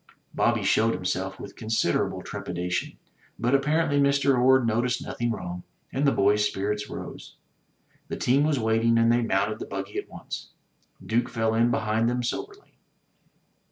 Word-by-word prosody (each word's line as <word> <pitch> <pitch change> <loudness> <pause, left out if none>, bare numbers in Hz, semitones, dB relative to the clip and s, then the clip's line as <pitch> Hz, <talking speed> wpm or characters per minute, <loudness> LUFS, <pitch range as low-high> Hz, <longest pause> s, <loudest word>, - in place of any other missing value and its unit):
Bobby - - +1
showed 115 +1 +3
himself 95 +1 -3
with 100 - -9
considerable 110 -6 0
trepidation; 90 0 -4 0.4
but 120 +3 0
apparently 150 +1 +2
Mr. 140 -1 +3
Orde 130 0 +4
noticed 120 +2 0
nothing 120 0 -2
wrong, 90 -5 -4 0.3
and 140 +2 +1
the - - +5
boy's 105 0 +3
spirits 105 +1 -2
rose. - - -8 0.7
The - - -4
team 135 +4 +3
was 150 -1 +2
waiting, 115 0 +2
and 115 0 +4
they 120 +1 +3
mounted 110 -1 0
the - - -6
buggy 100 +1 -4
at - - -8
once. - - -8 0.5
Duke 120 +2 0
fell 115 -2 0
in 115 +1 +3
behind 110 0 +1
them 125 0 -1
soberly. 410 - -6
115 Hz, 155 wpm, -26 LUFS, 105-125 Hz, 0.7 s, the